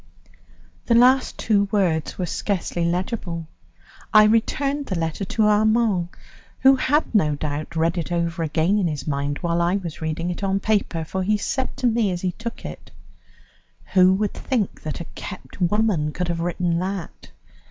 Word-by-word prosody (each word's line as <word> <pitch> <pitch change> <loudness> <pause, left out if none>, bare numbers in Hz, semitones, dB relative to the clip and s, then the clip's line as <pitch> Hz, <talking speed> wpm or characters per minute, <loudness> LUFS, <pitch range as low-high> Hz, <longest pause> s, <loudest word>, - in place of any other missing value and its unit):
The 235 - +4
last 255 +2 +4
two 205 -2 +2
words 175 -7 0
were 180 - -1
scarcely 175 -1 -2
legible. 175 -1 -2 0.7
I 215 0 +8
returned 275 +6 +1
the 185 - -2
letter 165 +3 -2
to 220 +4 0
Armand, 210 -3 +3 0.5
who 270 0 +7
had, 290 +3 +1
no 155 -9 +3
doubt, 150 +2 -4
read 165 +2 +1
it 165 - -5
over 170 0 -1
again 165 +5 +1
in 185 - +1
his 145 -4 -4
mind 145 -1 -2
while 170 -1 0
I 175 +2 +2
was 175 -6 -5
reading 160 +2 -2
it 175 - -6
on 195 0 +1
paper, 195 -6 0
for 190 +4 -3
he 210 +3 +1
said 260 +5 -3
to 265 - -2
me 230 -3 +2
as 175 -1 -3
he 185 - 0
took 230 +4 -7
it: - - -8 1.0
"Who 185 -1 +6
would 210 +1 -1
think 235 -8 -2
that 155 +2 -5
a - - -6
kept 185 0 -9
woman 180 -5 +1
could 180 0 -3
have 170 -1 -1
written 175 0 0
that?" 190 -1 -5
185 Hz, 175 wpm, -23 LUFS, 165-215 Hz, 1.0 s, I